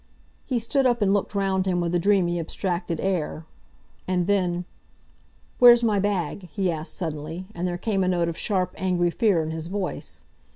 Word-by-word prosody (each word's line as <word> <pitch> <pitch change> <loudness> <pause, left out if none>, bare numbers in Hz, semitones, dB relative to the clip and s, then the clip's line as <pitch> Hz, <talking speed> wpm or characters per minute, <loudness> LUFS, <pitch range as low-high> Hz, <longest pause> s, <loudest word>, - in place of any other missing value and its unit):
He 255 - 0
stood 260 +4 +2
up 240 -3 +1
and 195 -1 +3
looked 205 0 -1
round 190 -1 +1
him 180 -1 +1
with 170 0 -1
a 175 - +3
dreamy, 175 -2 +2
abstracted 170 0 -3
air. 170 -4 -2 0.6
And 180 -1 +1
then, 180 -3 0 0.9
"Where's 240 -1 +8
my 215 -3 +2
bag?" 190 -2 -2
he 190 -3 0
asked 160 0 -5
suddenly, 160 +1 -5
and 175 -1 -2
there 175 -1 -2
came 195 0 0
a - - 0
note 175 -2 +1
of 170 - -3
sharp, 185 -2 -1
angry 180 -2 +1
fear 190 -5 +2
in 155 - -4
his 160 0 -4
voice. 190 0 -4
185 Hz, 180 wpm, -25 LUFS, 170-200 Hz, 0.9 s, Where's